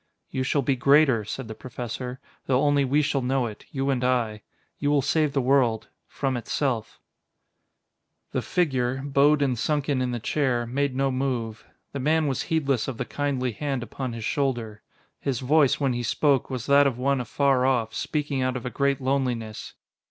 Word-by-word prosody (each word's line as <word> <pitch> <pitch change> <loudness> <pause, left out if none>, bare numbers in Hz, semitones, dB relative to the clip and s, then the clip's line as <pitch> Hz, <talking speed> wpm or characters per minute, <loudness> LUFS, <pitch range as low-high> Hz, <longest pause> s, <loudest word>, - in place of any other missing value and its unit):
"You 130 - -2
shall 140 +2 +1
be 135 +1 +1
greater," 140 -3 +4
said 120 +4 -6
the 110 - -6
Professor, 125 +2 -6 0.3
"though 130 +1 +2
only 145 -1 +3
we 140 +3 +2
shall 140 -1 0
know 130 0 0
it 105 -3 -8
you 135 0 -1
and 125 -2 -1
I.... 120 -4 0 0.4
You 145 - 0
will 145 -2 +3
save 155 -1 +1
the 135 - +2
world 125 -4 +2 0.2
from 135 -2 -2
itself." 120 -1 -2 1.3
The - - -1
figure, 135 -6 0
bowed 145 +1 +4
and 130 -3 +1
sunken 145 -1 0
in 125 - 0
the 120 -1 -2
chair, 125 -2 0
made 135 +2 -1
no 135 0 +1
move; 125 -4 -2 0.3
the 140 - -4
man 155 +4 +2
was 135 -3 -1
heedless 140 -7 +1
of 130 -4 -4
the - - -3
kindly 135 -3 -1
hand 135 +1 -3
upon 130 0 -5
his 115 -2 -5
shoulder. 120 -7 -1 0.4
His 130 -4 -2
voice, 140 +1 +3
when 135 -3 +1
he 120 - -2
spoke, 135 +3 +1
was 130 -4 -4
that 140 0 +5
of 130 -4 -2
one 135 +1 +1
afar 130 +2 +2
off, 120 -4 +1
speaking 145 -3 -2
out 130 0 0
of 125 - -8
a 125 - -3
great 140 -1 0
loneliness. 125 -5 -2
130 Hz, 185 wpm, -25 LUFS, 125-140 Hz, 1.3 s, that